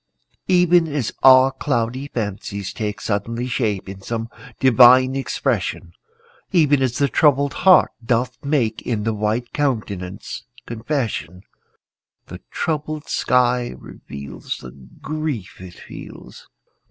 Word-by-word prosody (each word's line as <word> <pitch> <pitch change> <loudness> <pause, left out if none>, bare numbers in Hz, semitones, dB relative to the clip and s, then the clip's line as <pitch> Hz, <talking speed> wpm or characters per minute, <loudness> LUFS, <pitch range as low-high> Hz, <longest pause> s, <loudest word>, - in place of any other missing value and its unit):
Even 180 -2 +4
as 145 -6 -2
our 130 0 +7
cloudy 130 -1 -2
fancies 100 -4 -4
take 105 -1 -4
Suddenly 115 +4 -2
shape 110 -7 -2
in 95 0 -9
some 115 +2 -4 0.3
divine 130 +1 +6
expression, 135 - -2 0.6
Even 150 -7 +3
as 125 -2 0
the 140 - +2
troubled 140 0 +3
heart 185 -1 +5
doth 125 +1 -1
make 130 -7 0
In 110 -4 -2
the 110 +1 0
white 110 +3 -2
countenance 100 -9 -3 0.2
confession, 115 - -4 0.8
The - - -10
troubled 155 -1 -3
sky 125 -1 +1
reveals 70 -1 -8
The 65 - -10
grief 120 - -6
it 90 -2 -11
feels. - - -12
120 Hz, 115 wpm, -21 LUFS, 105-140 Hz, 0.8 s, our